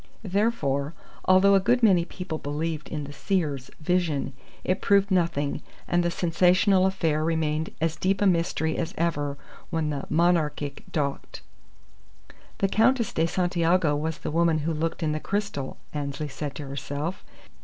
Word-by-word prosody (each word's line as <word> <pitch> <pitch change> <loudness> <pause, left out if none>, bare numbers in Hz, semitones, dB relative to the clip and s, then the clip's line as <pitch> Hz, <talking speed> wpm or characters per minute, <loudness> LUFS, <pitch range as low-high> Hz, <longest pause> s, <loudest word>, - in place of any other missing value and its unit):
Therefore, 180 -9 0 0.3
although 190 +2 +6
a 195 - +6
good 240 +5 +2
many 185 -6 +5
people 180 -4 -5
believed 150 +1 -3
in 150 -2 -3
the 145 0 -8
seeress's 150 -9 -1
vision, 160 -5 0 0.3
it 185 +2 0
proved 200 0 +3
nothing, 165 -6 +1 0.3
and 175 0 +2
the 175 - +1
sensational 185 +3 +3
affair 160 -5 0
remained 160 -1 0
as 165 0 0
deep 190 +1 +1
a 205 - +2
mystery 165 -3 +1
as 165 0 -3
ever 145 -4 -1 0.3
when 160 -3 -1
the 140 -2 -4
Monarchic 155 -4 +1
docked. 140 -3 -3 1.1
"The 195 - +2
Countess 230 +3 +2
de 165 +1 +2
Santiago 175 -3 +2
was 155 +2 -2
the - - -5
woman 165 0 +3
who 165 - 0
looked 165 +2 -2
in 155 - +1
the 155 - -1
crystal!" 200 -8 -3 0.2
Annesley 145 0 -3
said 140 +1 -5
to 145 - -6
herself. 145 +5 -4
165 Hz, 155 wpm, -26 LUFS, 150-185 Hz, 1.1 s, although